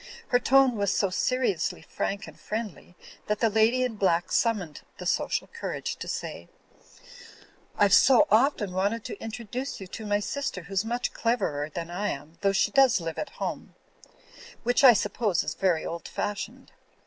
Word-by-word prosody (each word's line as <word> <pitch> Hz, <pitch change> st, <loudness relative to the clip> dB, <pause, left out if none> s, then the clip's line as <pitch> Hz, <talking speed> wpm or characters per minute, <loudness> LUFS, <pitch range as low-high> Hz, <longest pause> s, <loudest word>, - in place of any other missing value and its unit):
Her 245 Hz, -, +4 dB
tone 265 Hz, -1 st, +4 dB
was 200 Hz, -1 st, +1 dB
so 195 Hz, -1 st, +1 dB
seriously 245 Hz, -2 st, 0 dB
frank 200 Hz, 0 st, -3 dB
and -, -, -13 dB
friendly 210 Hz, -5 st, -6 dB, 0.3 s
that 210 Hz, 0 st, 0 dB
the 225 Hz, -2 st, +2 dB
lady 225 Hz, +4 st, +3 dB
in 240 Hz, -4 st, -2 dB
black 175 Hz, -3 st, +1 dB
summoned 205 Hz, -10 st, 0 dB, 0.2 s
the -, -, -8 dB
social -, -, 0 dB
courage 465 Hz, 0 st, -5 dB
to -, -, -7 dB
say: -, -, -5 dB, 1.3 s
'Tve 205 Hz, -1 st, +5 dB
so 270 Hz, +7 st, +6 dB
often 220 Hz, -3 st, +3 dB
wanted 200 Hz, +5 st, -1 dB
to 420 Hz, -, -7 dB
introduce 235 Hz, +4 st, -5 dB
you 195 Hz, -, -7 dB
to 215 Hz, +4 st, -8 dB
my 205 Hz, 0 st, +2 dB
sister 235 Hz, -4 st, -3 dB
who's 195 Hz, +3 st, -1 dB
much 240 Hz, +2 st, -2 dB
cleverer 190 Hz, -11 st, -1 dB
than 170 Hz, +2 st, -6 dB
I 205 Hz, +4 st, -2 dB
am, 150 Hz, +4 st, -7 dB
though 200 Hz, -1 st, +3 dB
she 195 Hz, -, +2 dB
does 270 Hz, -6 st, +5 dB
live 165 Hz, -1 st, -5 dB
at -, -, -3 dB
home; -, -, -5 dB, 0.9 s
which 245 Hz, +3 st, +2 dB
I 255 Hz, -3 st, +10 dB
suppose 205 Hz, -2 st, 0 dB
is -, -, -3 dB
very 180 Hz, -5 st, +1 dB
old 170 Hz, 0 st, -5 dB
fashioned. 220 Hz, +5 st, -5 dB
210 Hz, 170 wpm, -27 LUFS, 190-245 Hz, 1.3 s, I